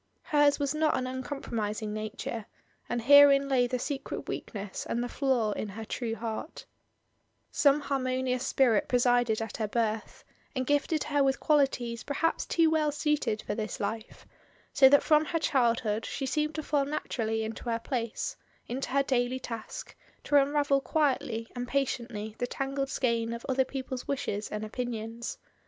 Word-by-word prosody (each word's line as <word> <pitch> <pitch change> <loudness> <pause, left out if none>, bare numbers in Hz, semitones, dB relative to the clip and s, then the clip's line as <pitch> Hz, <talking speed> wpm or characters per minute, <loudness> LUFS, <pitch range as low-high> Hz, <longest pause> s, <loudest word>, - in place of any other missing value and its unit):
Hers 290 -1 +4
was 280 0 -1
not 310 -2 +2
an 255 - -2
uncompromising 230 -5 -3
nature, 215 0 -5 0.4
and 240 -1 -1
herein 280 +1 +8
lay 255 -3 +3
the 250 - -1
secret 275 +2 -4
weakness 200 -3 -5
and 235 +1 0
the - - -2
flaw 245 -5 +1
in 205 - -3
her 220 +3 -7
true 225 +1 -3
heart 230 +7 -5 0.9
Some 285 0 +4
harmonious 255 -2 -1
spirit 255 -5 +3
presided 245 -3 +2
at 225 - -6
her 215 - -1
birth, 220 -1 -2 0.3
and 260 0 -1
gifted 290 +3 +1
her 290 -2 +1
with 270 0 +1
qualities 265 -6 +1
perhaps 330 +3 -1
too 330 -2 +3
well 305 -2 +2
suited 295 -7 0
for - - -3
this 215 0 -4
life, 220 +2 -5 0.5
so 265 -2 +8
that 285 +1 +6
from 305 -1 +4
her 330 - -1
childhood 230 -6 +1
she 275 - -3
seemed 300 +4 -1
to 310 - -3
fall 285 -2 +1
naturally 225 -6 -2
into 220 +2 -6
her 230 - +1
place, 230 -1 -3 0.3
into 260 +3 -3
her 275 +1 +2
daily 255 -1 0
task, 230 -3 -7 0.3
to 290 - 0
un 275 0 +2
ravel 285 -2 +2
quietly 255 -6 0
and 245 0 -4
patiently 235 -5 -2
the 245 - 0
tangled 275 +1 -2
skein 235 -5 0
of 235 - -7
other 265 -1 +2
people's 260 -1 -5
wishes 215 -6 -2
and 210 0 -4
opinions. 230 0 -4
255 Hz, 165 wpm, -29 LUFS, 225-280 Hz, 0.9 s, herein